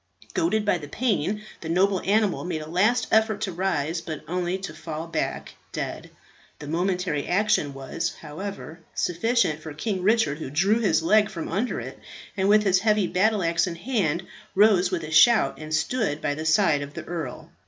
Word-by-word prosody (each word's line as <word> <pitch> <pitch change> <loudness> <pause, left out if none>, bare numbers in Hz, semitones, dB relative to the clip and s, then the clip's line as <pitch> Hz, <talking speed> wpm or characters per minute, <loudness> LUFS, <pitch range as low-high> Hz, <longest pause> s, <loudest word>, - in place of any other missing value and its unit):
Goaded 220 -11 +1
by 185 -4 +2
the 145 - -8
pain 215 - -1 0.2
the 160 - -7
noble 185 +2 +2
animal 205 0 +1
made 160 -3 -3
a - - -10
last 210 +8 +2
effort 220 -1 +3
to 200 - -1
rise, 165 -3 -1
but 160 -2 -6
only 180 +2 -1
to 190 -4 -7
fall 160 0 -6
back 165 - -3 0.2
dead. - - -5 0.5
The 150 - -9
momentary 175 -2 -1
action 180 -7 +1
was, 135 -1 -4
however, 175 +1 -7 0.2
sufficient 175 -3 +1
for 155 -1 -8
King 190 +3 -2
Richard, 210 -6 +2
who 145 - -5
drew 195 +10 +2
his 170 -8 +2
leg 210 +4 +4
from 170 -6 -5
under 215 +8 -1
it, - - -8 0.4
and 195 -1 +1
with 210 0 +5
his 190 -2 +3
heavy 210 -1 +2
battle 195 +3 +1
axe 170 +2 +1
in 170 - -4
hand, 175 - -1 0.3
rose 195 -3 +5
with 180 -3 -2
a 155 - -6
shout, 225 +9 +5
and 155 0 -8
stood 160 0 0
by 145 - -1
the 155 +2 -5
side 155 -3 +3
of 145 0 -7
the - - -5
earl. 165 -7 -6
180 Hz, 185 wpm, -25 LUFS, 160-210 Hz, 0.5 s, with